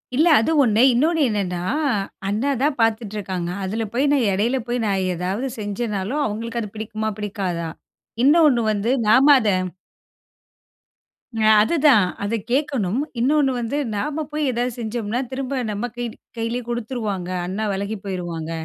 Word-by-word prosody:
இல்ல, 315 +5 +4
அது 230 - +1
ஒண்ணு. 225 -1 +3
இன்னொண்ணு 320 +7 +2
என்னான்னா, 195 -5 -2 0.7
அண்ணா 215 +8 0
தான் 290 0 +2
பாத்துட்டுருக்காங்க. 205 -6 -1
அதில 220 +4 -2
போய் 275 +4 +2
நான் 265 -5 +2
எடையில 230 +7 +1
போய் 240 -1 -1
நான் 195 -2 0
ஏதாவது 190 +9 -2
செஞ்சேன்னாலும், 210 +5 -2
அவுங்களுக்கு 230 +3 -3
அது 210 -1 -7
பிடிக்குமா? 220 0 -3
பிடிக்காதா? 190 -5 -3 0.5
இன்னொண்ணு 290 -5 +5
வந்து, 210 +3 0 0.2
நாம 265 +6 +7
அத 220 - -1 1.9
அ, - - 0 0.2
அதுதான். 280 - +4 0.2
அத 225 +3 0
கேக்கணும். 255 -8 0 0.2
இன்னொண்ணு 275 +2 +3
வந்து, 235 +5 -2 0.2
நாம 300 +8 -2
போய் 300 -3 0
ஏதாவது 245 0 -2
செஞ்சோம்ன்னா, 230 +1 -2
திரும்ப 265 0 -2
நம்ம 210 +4 -3
கை 240 -2 -4 0.2
கைலயே 230 +2 -2
குடுத்துருவாங்க. 220 -6 -3 0.2
அண்ணா 200 +4 -3
வெலகி 200 +3 -3
போய்ருவாங்க. 175 -4 -4
225 Hz, 135 wpm, -22 LUFS, 200-260 Hz, 1.9 s, நாம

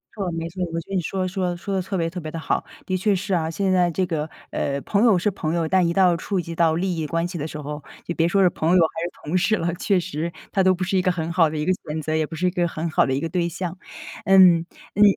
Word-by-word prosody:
没 - - -15
错 180 - -2
没 165 0 -4
错， 185 +2 -7
我 165 - -1
觉 - - -19
得 195 - -3
你 185 - +2
说 185 +3 -2
说 180 -1 -2
说 195 +3 -4
得 190 - +1
特 190 +2 -4
别 165 -1 0
特 180 - -6
别 155 -2 -6
地 165 - -5
好。 - - -1 0.2
的 185 0 -1
确 200 +2 +2
是 195 +1 -2
啊， 160 -1 0
现 190 +3 0
在 180 -2 +3
这 185 +3 0
个， 160 -3 -2 0.2
呃， 140 0 -1
朋 200 +7 +1
友 225 -6 +5
是 210 - +1
朋 165 -5 -3
友， 170 -2 0
但 185 0 +3
一 170 - 0
到 180 -1 +4
触 190 +2 -2
及 170 0 -7
到 165 -1 +3
利 180 +1 -1
益 160 - -2
关 165 +2 -1
系 175 -1 -6
的 150 +1 -3
时 150 - -7
候， 150 0 -6 0.2
你 170 - -1
别 165 - +2
说 195 +3 +2
是 185 - +6
朋 160 -1 -1
友 - - +6
还 165 0 0
是 175 - -3
同 165 +5 0
事 215 +4 +2
了， 170 -1 -1
确 190 +1 +1
实 170 -1 -3 0.2
他 195 - +2
都 185 0 +5
不 185 +1 -3
是 190 +1 0
一 - - +3
个 185 - +3
很 165 -1 -3
好 165 -3 +4
的 155 - -5
一 150 - -1
个 185 - +3
选 155 -3 -5
择， 155 +1 -2
也 160 0 +1
不 160 - -8
是 180 +3 0
一 - - +4
个 175 -1 +1
很 165 0 -3
好 155 - +3
的 130 - 0
一 135 - 0
个 165 - -2
对 170 0 0
象。 180 +2 -5 0.5
嗯 185 -4 +6 0.3
嗯， 205 - +5
175 Hz, 335 characters per minute, -23 LUFS, 160-185 Hz, 0.5 s, 是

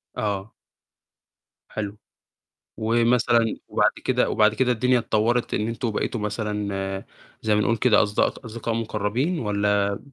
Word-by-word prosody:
آه. 100 0 -3 1.2
حلو، 105 -1 -5 0.8
ومثلًا 115 0 +2
وبعد - - +3
كده - - +2
وبعد 110 0 +3
كده 125 0 +2
الدنيا 125 +2 +2
اتطوّرت 115 +2 0
إن 105 +2 0
أنتم 115 0 -2
بقيتوا 110 +2 -2
مثلًا 100 -2 -3 0.4
زي 110 -1 +2
ما 105 - +3
نقُول 115 +2 +2
كده 110 -2 +4
أصد 105 -1 -3
أصدقاء 115 -1 -2
مقرّبين 115 - -1
والّا؟ 100 -2 +1
110 Hz, 125 wpm, -24 LUFS, 105-115 Hz, 1.2 s, كده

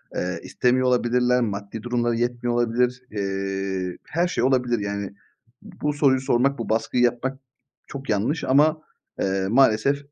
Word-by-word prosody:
Eee, - - -2
istemiyor 125 +1 +1
olabilirler. 125 0 +2
Maddi 105 0 -4
durumları 120 -1 0
yetmiyor 120 0 -1
olabilir. 120 +1 +1
Eee, 95 -2 -3
her 170 +3 0
şey 175 -9 -1
olabilir, 125 -3 +2
yani. 100 -1 -4 0.7
Bu 150 0 0
soruyu 140 -3 +3
sormak, 135 +1 +1
bu 115 - -4
baskıyı 115 +2 +1
yapmak 125 +2 0 0.5
çok 135 -2 -8
yanlış. 120 +10 0
Ama, 155 +4 +3 0.4
eee, 95 0 0
maalesef 135 +2 +4
120 Hz, 135 wpm, -23 LUFS, 105-130 Hz, 0.7 s, maalesef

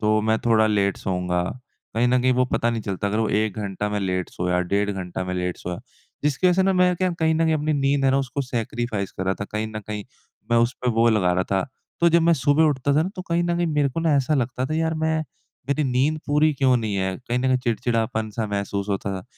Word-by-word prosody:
तो 110 0 +2
मैं 110 +1 +1
थोड़ा 110 -1 +4
लेट 100 -2 +1
सोऊँगा। 90 -1 -1 0.5
कहीं 120 +2 +2
न 125 +1 +3
कहीं 130 0 +3
वो 125 0 +2
पता 120 -1 0
नहीं 115 - -2
चलता 100 0 -3
अगर 105 +2 -1
वो 110 -1 +1
1 105 -1 0
घंटा 105 0 -3
में 105 - -1
लेट 95 -2 -1
सोया, 90 0 -1
डेढ़ 100 +3 0
घंटा 95 -2 -4
में 90 0 -3
लेट 90 -1 -2
सोया। 90 +1 -5 0.5
जिसकी 150 +5 +2
वज़ह 180 - +4
से 190 - +4
ना 195 0 +3
मैं 180 -1 +3
क्या 185 +1 +1
कहीं 160 0 +3
न 165 +1 +2
कहीं 160 -1 +2
अपनी 155 0 0
नींद 140 -1 +1
है 135 - +4
ना, 135 - +3
उसको 140 +1 -2
सैक्रिफ़ाइस 115 -4 -3
कर 95 - -1
रहा 95 +1 +1
था। - - -1
कहीं 105 +1 -1
न 110 0 -6
कहीं 105 -1 -5 0.5
मैं 120 - +4
उसपे 120 +2 0
वो 115 +1 +3
लगा 95 -5 +2
रहा 90 +1 +1
था। 95 -1 0 0.4
तो 170 - +6
जब 170 0 +4
मैं 170 +1 +4
सुबह 145 +2 +3
उठता 140 -2 +1
था 155 - +4
ना 175 - -2
तो 185 - -4
कहीं 170 -1 0
न 170 0 0
कहीं 175 - +1
मेरे 150 -3 +1
को 165 - -3
ना 165 -2 +2
ऐसा 140 +3 +1
लगता 130 -1 -1
था 155 - -3
यार 160 0 0
मैं 160 0 0 0.5
मेरी 145 +2 +1
नींद 135 +4 +1
पूरी 150 +2 +3
क्यों 130 -2 +3
नहीं 110 -4 -2
है? 95 -1 -1
कहीं 120 +1 +1
न - - -2
कहीं 130 0 +3
चिड़चिड़ापन-सा 115 -2 -1
महसूस 100 0 -3
होता 100 0 -2
था। 95 - -8
120 Hz, 255 wpm, -23 LUFS, 100-145 Hz, 0.5 s, तो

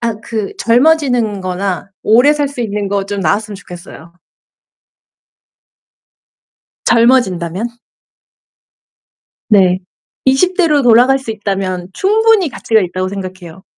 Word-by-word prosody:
아 230 -2 -2
그 220 -3 -4
젊어지는 245 -5 +2
거나 185 +1 -3
오래 245 +7 +4
살 290 -2 -1
수 275 -3 -8
있는 205 -3 -3
거 200 -1 -1
좀 200 -1 -4
나왔으면 205 +6 -1
좋겠어요. 175 -3 -12 2.7
젊어진다면. 230 -5 +2 1.8
네. 185 -3 +4 0.5
20 315 +9 +2
대로 305 -6 +3
돌아갈 250 +3 +4
수 230 -4 -6
있다면 195 -4 -3
충분히 425 -3 +2
가치가 220 -3 0
있다고 185 +1 -3
생각해요. 185 -2 -8
215 Hz, 225 characters per minute, -14 LUFS, 185-260 Hz, 2.7 s, 오래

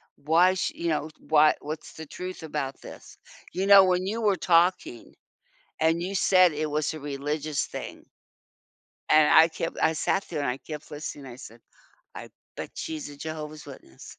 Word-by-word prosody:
why 170 +5 +3
she 185 - -3
you 170 - -3
know, 155 0 -1
why 155 0 +4
what's 155 +1 -7
the 160 - -9
truth 180 +2 -8
about 145 -3 -4
this. - - -12 0.4
You 190 +2 -1
know 200 -1 +8
when 185 0 +1
you 220 +4 -3
were 205 -3 +2
talking, 175 -8 +1 0.6
and 165 +2 +1
you 195 +2 -3
said 185 -3 +4
it 150 0 -3
was 150 0 -1
a 155 - -7
religious 145 +1 -3
thing - - -8 1.0
and 155 -1 +5
I 160 +1 +8
kept 165 0 -5
I 160 - +3
sat 195 +5 -1
there 160 -4 -4
and 140 - -1
I 125 - -3
kept 150 0 -9
listening 145 -1 -7
I 125 -1 -10
said, 115 -2 -13 0.5
"I - - -9 0.3
bet - - -7
she's 155 -2 -5
a 145 - -12
Jehovah's 155 -1 -7
Witness." 130 - -13
155 Hz, 180 wpm, -26 LUFS, 150-175 Hz, 1.0 s, know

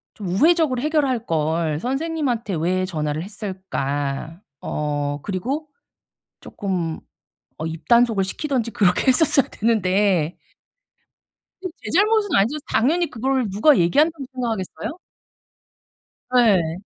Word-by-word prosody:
좀 205 - -6
우회적으로 280 - +3
해결할걸 170 - 0
선생님한테 260 - -2
왜 185 +4 0
전화를 155 -3 -3
했을까? 165 -7 -4 0.2
어 145 -1 -2
그리고 265 - -3 0.7
조금 180 -5 -3 0.6
어 160 - -3
입단속을 225 +6 +2
시키든지 250 +1 -2
그렇게 180 +1 +2
했었어야 275 0 +4
됐는데. 195 -6 +1 1.2
제 370 -2 -7
잘못은 420 +2 +3
아니죠. 230 +10 +2
당연히 320 +10 +1
그걸 255 0 -1
누가 220 +10 +4
얘기한다고 290 - +2
생각하겠어요? 240 - -4 1.4
예. 190 -9 +3
210 Hz, 260 characters per minute, -22 LUFS, 170-270 Hz, 1.4 s, 했었어야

